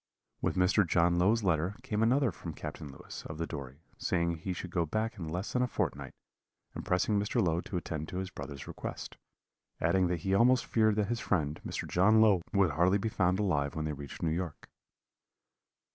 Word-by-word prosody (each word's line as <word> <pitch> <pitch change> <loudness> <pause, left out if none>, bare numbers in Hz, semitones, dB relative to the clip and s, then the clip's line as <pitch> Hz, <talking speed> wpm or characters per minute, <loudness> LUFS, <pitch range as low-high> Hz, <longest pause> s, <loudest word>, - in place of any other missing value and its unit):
"With - - 0
Mr. 95 +3 +4
John 85 0 +2
Low's 105 +5 +3
letter 90 +1 +1
came 110 -5 -1
another 125 +2 +3
from 80 -1 -8
Captain 75 0 -7
Lewis, 65 - -9
of 80 - -7
the 85 - -2
Dory, 70 -2 -8 0.2
saying 85 -1 0
he 95 +4 -4
should 90 0 -5
go 85 -2 +1
back 110 +7 -2
in 85 - -4
less 90 +6 -4
than 125 - +2
a 125 - +2
fortnight, - - -3 0.6
and - - -6
pressing 100 +3 +1
Mr. 105 +4 0
Low 85 -5 +2
to 90 - -4
attend 80 -2 -4
to 90 - -6
his 95 0 -4
brother's 70 -1 -7
request; - - -6 0.6
adding 90 +3 +3
that 85 -2 -2
he 95 +2 0
almost 120 +5 +4
feared 110 -2 +3
that 105 -1 0
his 120 0 -1
friend, 80 - -1
Mr. - - -4
John 105 +5 +4
Low, 105 -5 +5
would 100 -5 +3
hardly 90 +6 +3
be 110 +3 -2
found 95 -3 +1
alive 75 -9 0
when 80 -1 -2
they 75 - -2
reached 70 -2 -8
New 80 - +1
York. 85 -2 -5
90 Hz, 205 wpm, -31 LUFS, 80-105 Hz, 0.6 s, Low